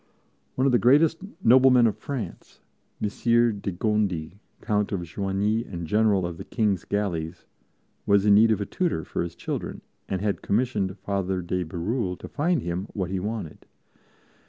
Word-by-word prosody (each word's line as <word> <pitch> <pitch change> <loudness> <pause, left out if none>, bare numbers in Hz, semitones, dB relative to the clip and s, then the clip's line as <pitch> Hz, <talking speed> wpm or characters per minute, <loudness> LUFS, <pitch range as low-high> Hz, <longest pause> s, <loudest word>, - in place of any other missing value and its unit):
One 130 - +1
of 135 - +4
the 120 - +4
greatest 150 +6 +4 0.2
noblemen 125 0 +6
of 110 -3 +2
France, 125 +2 -7 0.4
Messire 115 +3 +2
de 100 -1 -4
Gondi, 95 -3 -1 0.2
Count 105 -2 0
of 100 -3 -1
Joigny 100 +5 -1
and 85 -6 -6
General 105 +1 +2
of 85 -1 -5
the - - -7
King's 105 -7 0
Galleys, 90 -5 -3 0.6
was 100 0 +4
in 105 - +6
need 110 +3 +6
of 110 - +2
a 100 - -2
tutor 170 - -1
for - - -3
his 85 - -4
children - - -5 0.3
and 95 - -1
had 100 0 -1
commissioned 100 -4 0
Father 95 -1 -2
de 90 +1 -1
Bérulle 90 +4 -2
to - - -9
find 155 -1 0
him 90 +3 -3
what 95 -3 -3
he 95 - -1
wanted. 105 -5 -5
100 Hz, 165 wpm, -25 LUFS, 90-115 Hz, 0.6 s, noblemen